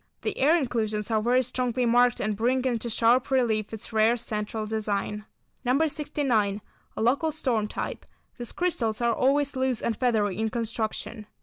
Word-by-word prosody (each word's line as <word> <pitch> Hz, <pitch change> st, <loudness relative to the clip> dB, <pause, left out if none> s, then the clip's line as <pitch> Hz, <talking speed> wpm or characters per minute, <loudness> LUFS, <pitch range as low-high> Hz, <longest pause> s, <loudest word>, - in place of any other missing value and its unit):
The -, -, -2 dB
air 305 Hz, +6 st, +5 dB
inclusions 220 Hz, -6 st, -2 dB
are 220 Hz, -1 st, +2 dB
very 250 Hz, +3 st, +3 dB
strongly 250 Hz, 0 st, -1 dB
marked 245 Hz, +1 st, +4 dB
and 210 Hz, 0 st, -1 dB
bring 250 Hz, +4 st, +1 dB
into 240 Hz, -2 st, -1 dB
sharp 235 Hz, +4 st, +3 dB
relief 230 Hz, -6 st, +1 dB
its 220 Hz, +1 st, -7 dB
rare 220 Hz, +2 st, +4 dB
central 215 Hz, -1 st, -4 dB
design. 210 Hz, -1 st, -2 dB, 0.4 s
No. 265 Hz, +5 st, +3 dB
69. 275 Hz, -9 st, 0 dB, 0.4 s
A -, -, -2 dB
local 280 Hz, +7 st, +2 dB
storm 245 Hz, -8 st, 0 dB
type. -, -, -5 dB, 0.4 s
These 240 Hz, -, -3 dB
crystals 240 Hz, -12 st, -1 dB
are 235 Hz, -1 st, +2 dB
always 280 Hz, +3 st, +2 dB
loose 260 Hz, -3 st, 0 dB
and 230 Hz, -, -1 dB
feathery 215 Hz, -6 st, +1 dB
in 220 Hz, 0 st, 0 dB
construction. 225 Hz, -1 st, -4 dB
235 Hz, 165 wpm, -26 LUFS, 215-255 Hz, 0.4 s, air